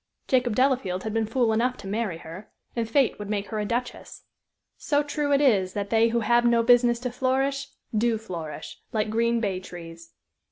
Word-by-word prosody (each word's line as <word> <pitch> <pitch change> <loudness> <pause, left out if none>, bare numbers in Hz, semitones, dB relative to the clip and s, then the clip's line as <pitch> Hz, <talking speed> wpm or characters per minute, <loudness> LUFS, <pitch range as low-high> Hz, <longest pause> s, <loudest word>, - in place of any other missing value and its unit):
Jacob 250 -4 +2
Delafield 250 -8 +1
had 220 - -3
been 225 -1 0
fool 230 0 +1
enough 245 +3 +1
to - - -11
marry 205 -3 -2
her, 165 +6 -10 0.3
and 230 -2 -2
fate 265 -3 +2
would 205 -1 -6
make 205 -1 -2
her 215 - -3
a 210 - -1
duchess. 240 +3 -4 0.5
So 290 -1 0
true 290 0 -2
it 280 0 +4
is 195 -9 +3
that 200 -1 -4
they 225 0 +4
who 235 0 0
have 240 +2 +3
no 235 -1 +3
business 240 0 +4
to 250 -1 -3
flourish 270 +2 0 0.3
do 225 +1 +2
flourish, 170 -8 -7
like 215 -2 -1
green 235 +1 +2
bay 195 -5 -1
trees. 170 -2 -11
230 Hz, 195 wpm, -26 LUFS, 205-250 Hz, 0.5 s, it